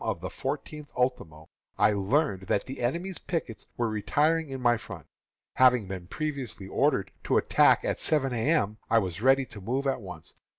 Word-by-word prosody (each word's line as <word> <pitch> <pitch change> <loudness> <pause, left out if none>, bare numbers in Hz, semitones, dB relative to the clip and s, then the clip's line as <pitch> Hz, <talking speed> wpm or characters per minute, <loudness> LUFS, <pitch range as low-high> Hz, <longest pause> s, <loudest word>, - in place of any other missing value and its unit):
of - - -2
the - - -6
fourteenth 150 -1 -5
ultimo, 80 -12 -2 0.3
I - - +4
learned 100 -1 0
that 100 - +1
the 135 0 -7
enemy's 170 +10 -2
pickets 155 - -4
were 120 - +1
retiring 150 +9 +1
in 135 -1 -5
my 120 -1 +3
front. 110 - -9 0.5
Having 125 -5 +5
been 90 -2 -6
previously 135 - -4
ordered 130 -3 +1
to - - +2
attack - - +4
at - - -1
seven 135 -5 +1
A. 115 +3 0
M., 110 -10 +1
I 115 - +4
was 95 -3 -1
ready 135 +2 +4
to 105 -4 -12
move 130 +8 -2
at 135 -2 0
once. 90 -5 -10
125 Hz, 180 wpm, -28 LUFS, 100-140 Hz, 0.5 s, Having